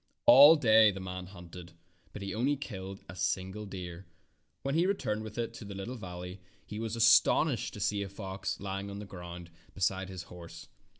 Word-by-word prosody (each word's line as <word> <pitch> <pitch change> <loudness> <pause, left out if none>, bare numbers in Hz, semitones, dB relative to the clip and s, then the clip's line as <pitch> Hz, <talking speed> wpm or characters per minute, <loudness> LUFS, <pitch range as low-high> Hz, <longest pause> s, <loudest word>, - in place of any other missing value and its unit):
All 145 +6 +10
day 110 -6 +6
the 95 -1 -4
man 95 -1 -6
hunted, 90 -2 -11 0.4
but 105 - -8
he 100 - -4
only 130 +6 +1
killed 95 -8 -7
a 85 - -9
single 95 +3 -2
deer. 90 -2 -8 0.6
When 135 - -1
he 170 +4 +3
returned 110 - -1
with 110 0 -8
it 115 -1 -2
to 115 - -9
the 100 -1 -8
little 100 +6 -5
valley 90 -4 -8 0.2
he 105 - -7
was 115 0 -3
astonished 115 +4 +4
to - - -8
see 100 0 0
a 100 - -4
fox 95 -1 -5
lying 100 0 -4
in 100 - -7
the 105 - -7
grass 90 -3 -9 0.3
beside 95 0 0
his 90 -2 -7
horse. 85 -1 -11
100 Hz, 190 wpm, -31 LUFS, 95-110 Hz, 0.6 s, All